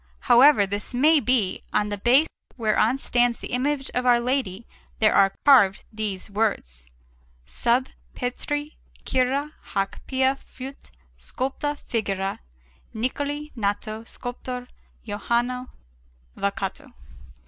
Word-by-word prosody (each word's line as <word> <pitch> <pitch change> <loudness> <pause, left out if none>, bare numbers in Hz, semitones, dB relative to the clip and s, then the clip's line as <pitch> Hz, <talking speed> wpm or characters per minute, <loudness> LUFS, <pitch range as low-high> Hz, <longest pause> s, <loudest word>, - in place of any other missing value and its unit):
However 245 -3 +6
this 205 +5 -3
may 305 +5 +5
be, 245 -7 +1
on 210 0 +1
the 205 - -3
base 255 +8 +5 0.3
whereon 225 +2 +2
stands 245 -3 +1
the - - -8
image 270 +2 -1
of 250 - -1
Our 245 -1 +5
Lady 235 -5 -1 0.3
there 215 -1 +4
are 195 0 +4
carved 225 -9 +6
these 210 -3 -3
words: 130 - -2 0.6
SUB 240 - +1 0.3
PETRI 290 +4 -3 0.3
CURA 265 +3 0
HÆC 195 -2 -2
PIA 265 0 +2
FUIT 270 +1 -11 0.3
SCULPTA 270 - -3
FIGURA, 195 -7 -2 0.6
NICOLI 285 +6 -2
NATO 215 0 -2
SCULPTORE 245 +1 -6 0.4
JOHANNE 240 +4 -1 0.7
VOCATO. 200 +7 -3
245 Hz, 110 wpm, -24 LUFS, 205-265 Hz, 0.7 s, However